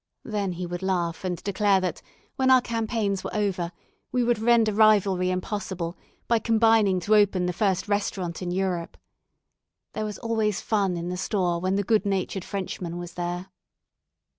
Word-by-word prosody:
Then 205 -4 -2
he 180 +1 -4
would 175 +1 -5
laugh 175 -3 -1
and 180 -2 -2
declare 200 -1 +2
that, 180 -3 -3 0.3
when 260 0 +2
our 260 0 +8
campaigns 220 -4 -1
were - - -5
over, 190 -5 -1 0.4
we 250 -1 +1
would 240 -2 +1
render 225 -1 +4
rivalry 200 -4 +4
impossible, 185 -2 -3 0.3
by 235 -1 +3
combining 225 -4 +3
to 215 +4 +3
open 200 -3 +3
the 180 - -1
first 190 0 0
restaurant 195 -4 -2
in 180 - -3
Europe. 180 -2 -2 1.0
There 215 - -2
was 210 -2 -5
always 220 -3 0
fun 195 -5 0
in 170 +1 -4
the 180 - -3
store 180 -3 0
when 185 +2 0
the 200 - +1
good 215 0 +2
natured 190 -1 -1
Frenchman 185 -3 -4
was 175 -1 -7
there. 175 +2 -4
195 Hz, 165 wpm, -26 LUFS, 180-215 Hz, 1.0 s, our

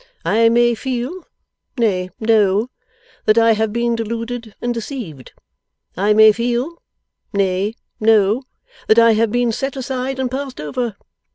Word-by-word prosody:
I 230 +2 +4
may 240 +1 +3
feel 260 +8 -4 0.5
nay, 190 -6 0
know 220 +1 +2 0.6
that 215 +1 +4
I 230 0 +5
have 220 0 0
been 235 +1 0
deluded 230 0 -5
and 240 0 -2
deceived. 225 - -7 0.6
I 200 +4 +1
may 215 0 +7
feel 240 +9 -2 0.5
nay, 200 +2 0 0.2
know 215 +1 +3 0.5
that 220 - +4
I 230 0 +7
have 220 0 +1
been 245 0 +1
set 270 +4 -3
aside 265 0 -3
and 260 -2 -2
passed 270 0 -5
over. 215 - -3
230 Hz, 140 wpm, -19 LUFS, 215-245 Hz, 0.6 s, may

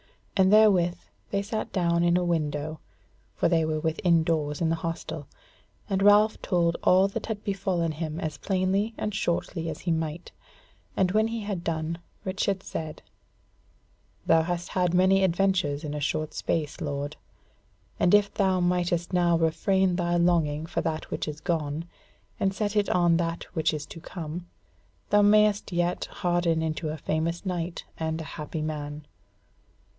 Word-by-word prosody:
And 190 -1 +4
therewith 195 -5 +5 0.3
they 200 0 -1
sat 215 +2 -4
down 170 -2 +1
in 175 0 +4
a 180 - 0
window, 155 -2 -1 0.6
for - - +2
they 165 -1 +3
were 155 0 -1
within 165 +1 +2
doors 150 -3 -1
in 165 - +1
the 165 - +1
hostel, 165 -3 -4 0.6
and 195 0 0
Ralph 205 +2 +5
told 170 -2 +1
all 190 +2 +5
that 210 +2 -5
had 215 -2 -4
befallen 190 -4 -1
him 155 0 -4
as 155 -2 -4
plainly 195 +3 0
and 210 - -2
shortly 170 -2 -1
as - - -6
he 175 - -1
might; 160 +1 -3 0.7
and 185 -1 +3
when 215 +2 +3
he 230 0 -3
had 200 -4 -4
done, 165 0 -2 0.3
Richard 195 0 -1
said: 155 -1 -6 1.2
"Thou 165 0 +5
has 175 +1 -3
had 180 -1 +1
much 185 +1 +5
adventure 190 -5 +2
in 150 -1 -4
a 150 - -3
short 155 +2 -2
space, 150 -3 -2
lord, 145 0 -3 0.8
and 180 - +5
if 205 -1 +3
thou 190 -3 +2
mightest 175 0 0
now 175 -1 +3
refrain 180 +3 +2
thy 175 -1 +1
longing 160 -3 +2
for - - -2
that 160 -1 -3
which - - -3
is 150 0 -5
gone, 160 -3 -2 0.5
and 195 0 +1
set 210 0 -1
it 205 -1 +2
on 175 -2 +3
that 165 0 -2
which 160 -3 +1
is 150 -2 -4
to 165 - -10
come, 170 0 -7 0.6
thou 205 - +6
mayest 210 0 +4
yet 175 0 0
harden 175 -2 0
into 155 0 -2
a 155 - -4
famous 160 +5 -2
knight 175 -2 -3 0.2
and 160 0 -2
a - - -4 0.2
happy 155 +1 -4
man." 150 -1 -5
170 Hz, 165 wpm, -27 LUFS, 160-190 Hz, 1.2 s, thou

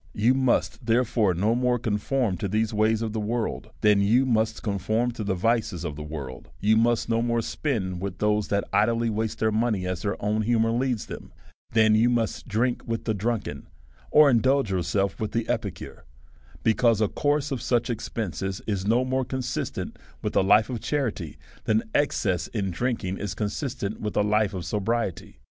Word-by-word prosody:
You 115 +5 +4
must 130 -2 0
therefore 115 -5 +2
no 105 +6 +2
more 125 0 +2
conform 110 0 0
to 100 - -2
these 110 +3 0
ways 110 +1 +2
of 110 -2 -3
the 110 - -2
world, 110 +2 -2
than 105 -1 +4
you 115 +7 +4
must 110 -3 0
conform 110 +4 0
to 115 -2 -5
the 100 -2 -1
vices 105 -3 0
of 75 -4 -4
the 75 - -7
world; 75 -4 -7
you 110 +2 +3
must 115 +1 +2
no 115 0 +1
more 115 0 +1
spend 95 - -2
with 100 -1 -4
those 105 0 +1
that 100 0 0
idly 115 0 +2
waste 110 +1 -2
their 110 0 +1
money 110 -3 0
as 90 -2 -3
their 100 +2 -2
own 105 +1 0
humour 115 0 +2
leads 120 -1 0
them, - - -9 0.4
than 110 -1 +5
you 110 +3 +4
must 115 -3 -1
drink 120 +3 0
with 115 -1 -3
the 110 - +1
drunken, 100 -8 -3 0.4
or 150 0 +7
in 125 -4 +5
dulge 135 -4 +2
yourself 95 +2 0
with 105 -1 -3
the 115 -1 -1
epicure; - - -4 0.6
because 115 0 +3
a 110 - +3
course 145 +5 0
of 130 - -2
such 120 -2 +1
expenses 95 -5 -3
is 100 -2 -2
no 120 +4 +3
more 130 +1 0
consistent 130 0 -4 0.2
with - - -2
a - - +5
life 105 +4 +4
of 120 - -3
cha - - -2
rity, 105 - -3 0.3
than 110 +1 +2
excess 100 - +1
in 100 -4 -2
drinking 100 -2 -2
is 100 -1 -4
consistent 110 0 -3
with 105 -1 -3
a - - +4
hfeof 105 -3 +1
sobriety. 105 +2 -2
110 Hz, 190 wpm, -26 LUFS, 100-120 Hz, 0.6 s, or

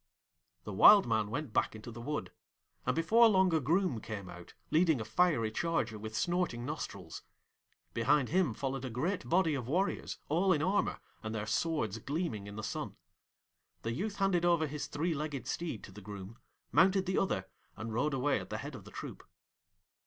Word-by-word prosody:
The 105 - -6
Wild 200 - +8
Man 110 -3 +1
went 145 0 -4
back - - +1
into 110 +2 -8
the 120 +1 -8
wood, 150 +5 -3 0.6
and - - +2
before 225 +9 +5
long 190 -3 +4
a 160 - +4
Groom 155 - +1
came 100 -4 -6
out, 90 0 -12 0.2
leading 160 -3 +4
a 110 - -4
fiery 115 -2 +2
charger 120 -6 -1
with 110 +1 -5
snorting 175 -9 0
nostrils. 150 +2 -6 0.7
Behind 135 +3 +2
him 170 -9 +2
followed 135 0 -3
a 130 - -3
great 155 - -2
body 170 -2 +3
of 130 -5 -3
warriors, 185 +8 -1
all 180 +5 +3
in 150 -1 0
armour, 195 +4 +1 0.2
and 110 0 -4
their 105 -1 -2
swords 115 - -1
gleaming 135 - -3
in 100 - -8
the 110 - -5
sun. - - -4 0.9
The 115 - -1
youth 200 - -3
handed 195 -4 +2
over 170 -2 +3
his 150 0 -4
three 165 +3 -1
legged 150 -2 -4
steed 165 -11 -3
to - - -10
the 105 +2 -11
Groom, 100 +2 -9 0.3
mounted 190 +4 +4
the 190 0 +1
other, 95 - 0 0.3
and 110 0 -5
rode 135 +5 +1
away 135 +2 +1
at - - -9
the - - -3
head - - -6
of - - -10
the - - -10
troop. - - -8
145 Hz, 190 wpm, -33 LUFS, 110-175 Hz, 0.9 s, Wild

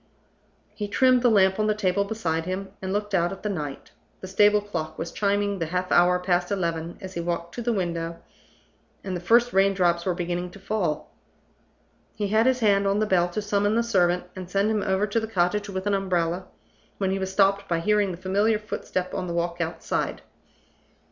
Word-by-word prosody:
He 210 - -4
trimmed 255 +4 +4
the 245 - +4
lamp 190 -2 +4
on 215 - +2
the 215 - +2
table 200 -1 +1
beside 170 -6 -2
him 190 +2 -4
and 190 0 -3
looked 205 +1 -2
out 175 -2 +2
at 195 - -8
the 210 - -1
night. 150 -8 -5 0.3
The 185 - -6
stable 205 +2 +4
clock 165 -7 -5
was 165 - -4
chiming 200 -1 0
the 165 - -1
half 180 +2 -2
hour 180 +1 +5
past 180 -1 0
eleven 170 -4 -2
as 190 -1 -8
he 170 - -3
walked 170 0 -3
to 240 - -5
the 240 +1 0
window, 170 -4 -2 0.9
and 190 -2 -3
the 175 - -4
first 235 +6 +3
rain 195 +1 +4
drops 175 -2 +2
were 180 -1 0
beginning 175 0 -3
to 200 - -12
fall. 190 -6 -2 1.0
He 205 -2 -2
had 220 +3 +3
his 255 -1 +2
hand 200 -2 +3
on 195 +1 +2
the 215 - +2
bell 180 -4 +2
to 210 +4 -3
summon 205 +1 +1
the 235 - +2
servant, 180 -6 +2
and 185 -2 -7
send 200 +3 +1
him 215 -1 0
over 190 +1 +1
to 215 +2 0
the 220 - -4
cottage 205 0 0
with 190 0 -4
an 205 - +1
umbrella, 185 -2 0 0.5
when 190 -1 0
he 195 - -1
was 190 0 -3
stopped 195 0 +2
by 170 -1 0
hearing 210 +3 +2
the 175 - -5
familiar 200 +4 +1
footstep 200 -3 -4
on 185 - -3
the 170 - -3
walk 170 0 -1
outside. 165 0 -2
190 Hz, 210 wpm, -25 LUFS, 175-205 Hz, 1.0 s, hour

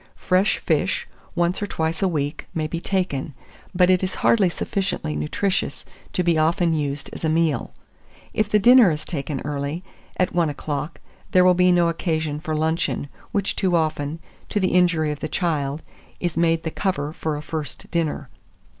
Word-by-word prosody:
Fresh 185 +3 +2
fish, - - +1 0.3
once 175 +2 +1
or 205 - -1
twice 160 -3 -2
a 195 - +3
week, 150 -3 -2
may 155 -1 0
be 165 +2 -3
taken; 175 -8 -1 0.4
but 180 0 +5
it 185 0 +3
is 185 - -2
hardly 205 -6 +5
sufficiently 185 - -2
nutritious 190 - -1 0.3
to 180 - 0
be 170 -2 +3
often 165 +2 +2
used 145 -2 -2
as - - -8
a 160 - +2
meal. 155 -5 +1 0.6
If 215 -1 +1
the 210 - +4
dinner 240 0 +7
is 155 -2 -3
taken 140 -3 -3
early, 145 +4 -3 0.3
at 185 0 +1
one 170 -3 +2
o'clock, 145 +2 -4 0.3
there 180 0 +6
will 185 - +7
be 180 0 +4
no 175 -1 +4
occasion 160 -3 -1
for 155 0 -3
luncheon, 160 -2 0 0.2
which 200 -2 -1
too 185 -2 +1
often, 155 -2 0 0.3
to 210 - 0
the 185 - +2
injury 170 -4 +3
of 150 - -5
the 155 - -4
child, 150 -3 -1 0.4
is 175 -2 -2
made 165 0 +2
the 160 - -3
cover 155 -7 -2
for 155 -2 -2
a - - -5
first 155 -2 -5
dinner. 155 -4 -1
165 Hz, 180 wpm, -23 LUFS, 150-180 Hz, 0.6 s, dinner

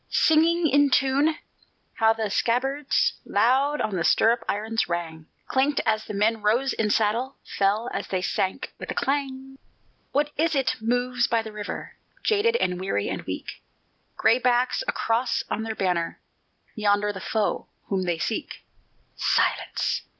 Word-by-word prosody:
Singing 330 +1 +3
in 285 0 +4
tune, 275 +4 +2 0.6
how 225 0 +3
the 220 -2 -3
scabbards 270 +6 +1
Loud 265 +8 +2
on 205 - -1
the 170 - 0
stirrup 230 +6 +3
irons 220 0 -1
rang, 160 -2 -4 0.2
Clinked 275 +2 +1
as 215 -1 +1
the 210 - -6
men 215 +2 +1
rose 240 +6 +2
in 215 -1 0
saddle, 230 +5 +1
Fell 205 +4 0
as - - -3
they 185 -1 -2
sank 190 0 -2
with - - -7
a - - -3
clang. 270 -1 -2 0.5
What 295 +1 +1
is 320 +1 +1
it 270 -2 +1
moves 245 +1 +1
by 230 -1 +1
the 220 - -8
river, 210 -1 -7 0.3
Jaded 440 +2 +2
and 180 - 0
weary 145 - -1
and - - -3
weak, - - -6 0.6
Gray 230 +3 +4
backs 250 - +1
a - - +2
cross 235 +2 0
on - - -1
their 220 0 -4
banner 180 -4 -1 0.5
Yonder 205 -1 +1
the 190 - -8
foe 215 +1 -1 0.2
whom 195 -2 0
they 175 -2 0
seek. 170 +8 -4 0.5
Silence! - - 0
230 Hz, 155 wpm, -25 LUFS, 205-270 Hz, 0.6 s, in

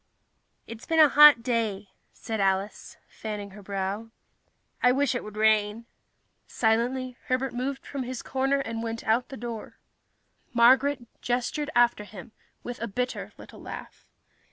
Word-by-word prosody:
"It's 230 +1 -10
been 325 - 0
a 305 -2 +8
hot 295 -5 +8
day," 220 -5 -1 0.2
said 220 -1 -5
Alice, 195 +1 -1
fanning 210 -2 -7
her 205 +2 -12
brow. 200 +3 -4 0.7
"I 250 - +5
wish 275 +2 +1
it 245 - -3
would 210 0 -10
rain." 215 +1 +2 0.6
Silently, 245 +3 0
Herbert 255 0 -1
moved 265 +3 -4
from 280 - -5
his 255 0 -5
corner 270 +1 0
and 225 -3 -4
went 230 0 -4
out 230 +3 +1
the 270 - -8
door. 230 -1 -7 0.8
Marguerite 255 +2 +4
gestured 250 +5 -1
after 240 -3 +3
him 205 0 -11 0.3
with 245 -2 -7
a 230 - -2
bitter 250 +5 -4
little - - -13
laugh. - - -10
235 Hz, 145 wpm, -27 LUFS, 215-255 Hz, 0.8 s, a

